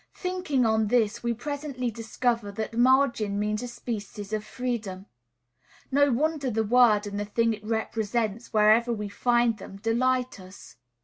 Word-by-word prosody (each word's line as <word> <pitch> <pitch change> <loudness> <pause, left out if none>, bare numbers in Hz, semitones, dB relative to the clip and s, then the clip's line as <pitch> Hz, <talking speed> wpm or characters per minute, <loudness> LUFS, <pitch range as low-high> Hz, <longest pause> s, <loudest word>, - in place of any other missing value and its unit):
Thinking 365 -9 -1
on 220 -1 +2
this, 215 -2 +1
we 235 - -1
presently 275 0 -4
discover 230 -1 -2
that 220 +2 -4
margin 240 -5 +3
means 210 +1 -1
a 245 - -4
species 215 -3 -6
of 215 -1 -1
freedom. 215 -7 -4 0.9
No 285 +1 +4
wonder 290 +2 0
the 225 -1 0
word, 220 -2 +4
and 205 0 -4
the 205 - -2
thing 230 +2 +1
it 210 -1 -9
represents, 220 0 -2
wherever 220 +2 +4
we 210 -3 -3
find 240 0 +1
them, 195 - -10
delight 250 +3 0
us. 185 +1 -13
230 Hz, 150 wpm, -26 LUFS, 210-250 Hz, 0.9 s, No